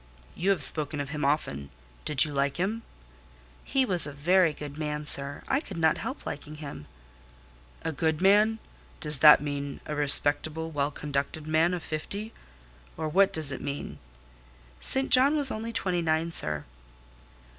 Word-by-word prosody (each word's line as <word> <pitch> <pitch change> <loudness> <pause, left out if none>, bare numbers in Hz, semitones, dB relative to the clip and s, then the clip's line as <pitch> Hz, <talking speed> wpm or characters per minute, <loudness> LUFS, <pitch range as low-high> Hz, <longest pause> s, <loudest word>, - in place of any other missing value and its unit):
"You 185 +4 -2
have 185 -7 +1
spoken 150 0 +3
of 140 -1 -4
him 150 0 -5
often: 70 - -2 0.4
do 150 - -2
you 150 +2 +4
like 140 +1 -1
him?" 205 +6 -2 0.8
"He 265 -1 0
was 180 -8 +7
a - - -6
very 170 +4 +2
good 145 -1 -9
man, 150 -1 -4
sir; 140 -1 +1
I 270 - +1
could 200 - -10
not 160 -1 +1
help 265 - -7
liking 150 +1 -7
him." 140 - -9 1.0
"A 160 - -2
good 160 +1 -1
man. 210 +4 +3 0.4
Does 150 -3 -1
that 150 -1 +8
mean 145 -1 -5
a 150 - -5
respectable 150 +2 +2
well 145 -1 -1
conducted 145 +1 -4
man 160 +2 +1
of 175 - -7
fifty? 200 +8 -6 0.6
Or 160 0 -3
what 190 +5 +3
does 155 -3 +2
it 135 - -6
mean?" 140 0 -6 0.8
"St 265 - +2
John 275 +4 +5
was 280 -3 +2
only 225 +2 -5
twenty 185 -5 -2
nine, 160 +1 -1
sir." 75 - 0
155 Hz, 165 wpm, -27 LUFS, 145-185 Hz, 1.0 s, that